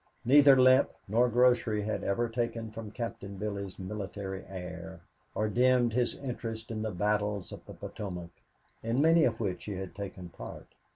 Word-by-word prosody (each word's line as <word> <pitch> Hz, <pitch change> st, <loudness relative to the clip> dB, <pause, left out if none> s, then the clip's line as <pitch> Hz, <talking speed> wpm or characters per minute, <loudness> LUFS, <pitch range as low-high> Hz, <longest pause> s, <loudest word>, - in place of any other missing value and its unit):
Neither 140 Hz, +1 st, +7 dB
limp 130 Hz, +1 st, +6 dB, 0.2 s
nor 120 Hz, +5 st, +3 dB
grocery 120 Hz, -3 st, +3 dB
had 110 Hz, -, -2 dB
ever 115 Hz, +4 st, +1 dB
taken 115 Hz, -1 st, -3 dB
from 110 Hz, -1 st, -7 dB
Captain 100 Hz, -3 st, -6 dB
Billy's 100 Hz, -1 st, -4 dB
military 95 Hz, 0 st, -5 dB
air 90 Hz, -2 st, -7 dB, 0.3 s
or 110 Hz, -, +1 dB
dimmed 125 Hz, +1 st, +3 dB
his 120 Hz, 0 st, +1 dB
interest 115 Hz, -4 st, -5 dB
in 110 Hz, -1 st, -3 dB
the 110 Hz, -, -1 dB
battles 105 Hz, +1 st, -1 dB
of -, -, -9 dB
the -, -, -9 dB
Potomac, 90 Hz, -4 st, -6 dB, 0.5 s
in 115 Hz, +3 st, 0 dB
many 165 Hz, +2 st, +5 dB
of 115 Hz, -2 st, 0 dB
which 100 Hz, -5 st, -2 dB
he 105 Hz, -, -4 dB
had 95 Hz, -1 st, -6 dB
taken 95 Hz, -3 st, -7 dB
part. -, -, -10 dB
110 Hz, 165 wpm, -30 LUFS, 100-120 Hz, 0.5 s, Neither